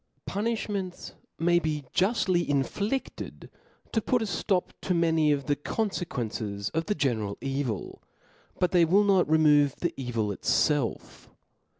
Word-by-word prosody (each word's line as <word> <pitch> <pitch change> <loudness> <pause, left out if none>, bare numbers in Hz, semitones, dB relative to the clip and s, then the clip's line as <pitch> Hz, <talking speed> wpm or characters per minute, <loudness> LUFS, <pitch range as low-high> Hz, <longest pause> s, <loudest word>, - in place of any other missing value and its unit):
Punifliments 205 -3 -3 0.2
maybe 160 -4 +1
juftly 185 -3 +2
inflifted 200 - -2 0.4
to 225 - +1
put 245 +1 +1
a - - -1
flop 185 -1 -1
to 180 - 0
many 160 -2 +3
of 140 -2 0
the 145 - +1
confequences 125 - -3
of 165 +1 -2
the 210 - +1
general 110 - -1
evil, 135 -6 -3 0.6
but 180 - +1
they 175 -2 +5
will 190 +5 +4
not 195 -5 +3
remove 150 -3 +4
the 175 - -2
evil 120 -5 -2
itfelf. 135 +6 0
160 Hz, 125 wpm, -27 LUFS, 135-190 Hz, 0.6 s, they